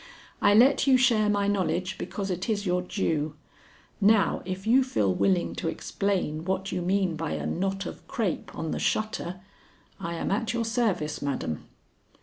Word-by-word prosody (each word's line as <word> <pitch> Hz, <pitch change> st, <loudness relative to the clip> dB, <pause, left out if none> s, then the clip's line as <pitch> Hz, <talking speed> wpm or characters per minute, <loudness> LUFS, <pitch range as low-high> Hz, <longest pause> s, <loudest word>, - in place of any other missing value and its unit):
I 205 Hz, 0 st, +5 dB
let 265 Hz, +5 st, +5 dB
you 265 Hz, -1 st, +7 dB
share 230 Hz, -5 st, +3 dB
my 205 Hz, -1 st, +1 dB
knowledge 185 Hz, -2 st, 0 dB
because 195 Hz, -2 st, -4 dB
it 180 Hz, +4 st, -3 dB
is 210 Hz, -1 st, 0 dB
your 180 Hz, -1 st, +1 dB
due. 160 Hz, -5 st, -1 dB, 0.7 s
Now 205 Hz, -2 st, +4 dB
if 185 Hz, +1 st, -5 dB
you 250 Hz, +4 st, +5 dB
feel 105 Hz, -, +1 dB
willing 185 Hz, -, +1 dB
to -, -, -2 dB
explain 175 Hz, -3 st, -1 dB
what 190 Hz, +1 st, -2 dB
you 180 Hz, -, -2 dB
mean 185 Hz, -1 st, +1 dB
by 160 Hz, 0 st, -3 dB
a -, -, -3 dB
knot 195 Hz, +2 st, -1 dB
of -, -, -8 dB
crape 205 Hz, -9 st, -2 dB
on 160 Hz, -, -3 dB
the -, -, -2 dB
shutter, 185 Hz, -4 st, -1 dB, 0.6 s
I 170 Hz, 0 st, -4 dB
am 165 Hz, -, -2 dB
at 225 Hz, +3 st, 0 dB
your 235 Hz, -1 st, 0 dB
service, 215 Hz, -10 st, 0 dB
madam." 135 Hz, -, -3 dB
195 Hz, 170 wpm, -27 LUFS, 170-215 Hz, 0.7 s, you